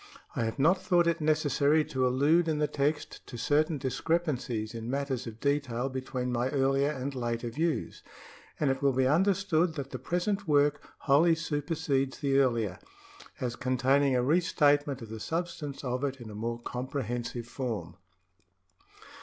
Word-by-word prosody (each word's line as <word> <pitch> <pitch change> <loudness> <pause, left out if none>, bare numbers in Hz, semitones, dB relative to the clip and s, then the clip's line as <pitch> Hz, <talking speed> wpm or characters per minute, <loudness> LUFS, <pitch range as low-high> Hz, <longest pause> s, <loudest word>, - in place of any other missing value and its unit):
I 115 - 0
have 110 - -3
not 170 +7 +3
thought 175 -2 +3
it 170 -1 +1
necessary 150 0 +2
to 130 -2 0
allude 150 +7 +3
in 155 -2 +1
the 150 0 +1
text 145 +2 -2
to 120 - -8
certain 150 +5 +1
discrepancies 130 -6 -1
in 115 0 -5
matters 135 -2 -2
of 115 0 -8
detail 135 -3 0
between 130 -1 -3
my 120 +1 0
earlier 135 +1 +2
and 140 -1 -3
later 120 -2 -3
views, 160 +5 -2 0.6
and 145 -3 +2
it 135 - -3
will 140 -1 +3
be 130 +1 +2
understood 175 +1 +2
that 140 -3 -5
the - - -5
present 195 +3 -1
work 145 -1 +3 0.2
wholly 160 +4 +4
supersedes 145 -3 -1
the 140 -1 +2
earlier, 115 -8 +1 0.6
as 120 -2 -2
containing 130 +2 +2
a 125 - +2
re 155 +7 +4
statement 145 -5 +2
of 110 - -10
the 110 0 -6
substance 160 -1 -4
of 125 +1 -2
it 135 -1 -2
in 115 -3 -9
a - - -9
more 115 +2 -3
comprehensive 120 -1 -4
form. 115 -9 -4
140 Hz, 160 wpm, -29 LUFS, 125-155 Hz, 0.6 s, wholly